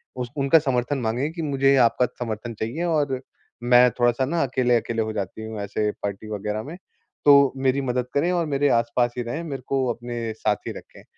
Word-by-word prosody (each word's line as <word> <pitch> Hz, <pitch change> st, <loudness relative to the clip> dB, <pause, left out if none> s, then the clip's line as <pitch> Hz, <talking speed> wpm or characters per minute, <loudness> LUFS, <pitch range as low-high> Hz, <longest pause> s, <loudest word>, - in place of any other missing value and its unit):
उस 125 Hz, -1 st, -4 dB
उनका 140 Hz, +3 st, +5 dB
समर्थन 135 Hz, -1 st, -1 dB
माँगे 125 Hz, +7 st, -1 dB
कि 165 Hz, -, -6 dB
मुझे 140 Hz, -2 st, +2 dB
आपका 125 Hz, -, +1 dB
समर्थन 115 Hz, 0 st, -4 dB
चाहिए 120 Hz, +10 st, -3 dB
और 145 Hz, -6 st, 0 dB, 0.4 s
मैं 125 Hz, +1 st, +6 dB
थोड़ा-सा 120 Hz, +2 st, +2 dB
ना 165 Hz, +2 st, 0 dB
अकेले-अकेले 120 Hz, -3 st, +1 dB
हो 110 Hz, 0 st, -4 dB
जाती 105 Hz, +1 st, -5 dB
हूँ 110 Hz, -1 st, -6 dB
ऐसे 105 Hz, +1 st, -1 dB
पार्टी 100 Hz, +1 st, -4 dB
वग़ैरह 105 Hz, +1 st, -3 dB
में 160 Hz, +7 st, -8 dB, 0.5 s
तो 140 Hz, -2 st, +7 dB
मेरी 135 Hz, +1 st, +1 dB
मदद 125 Hz, -1 st, -1 dB
करें 170 Hz, +6 st, +2 dB
और 170 Hz, -2 st, +1 dB
मेरे 145 Hz, 0 st, +1 dB
आस-पास 120 Hz, +1 st, 0 dB
ही 120 Hz, -, -1 dB
रहें, 135 Hz, +9 st, -4 dB
मेरे 140 Hz, -5 st, -5 dB
को 135 Hz, -1 st, +1 dB
अपने 120 Hz, -1 st, -5 dB
साथ 105 Hz, -1 st, 0 dB
ही -, -, -2 dB
रखें। -, -, -13 dB
125 Hz, 195 wpm, -24 LUFS, 115-140 Hz, 0.5 s, तो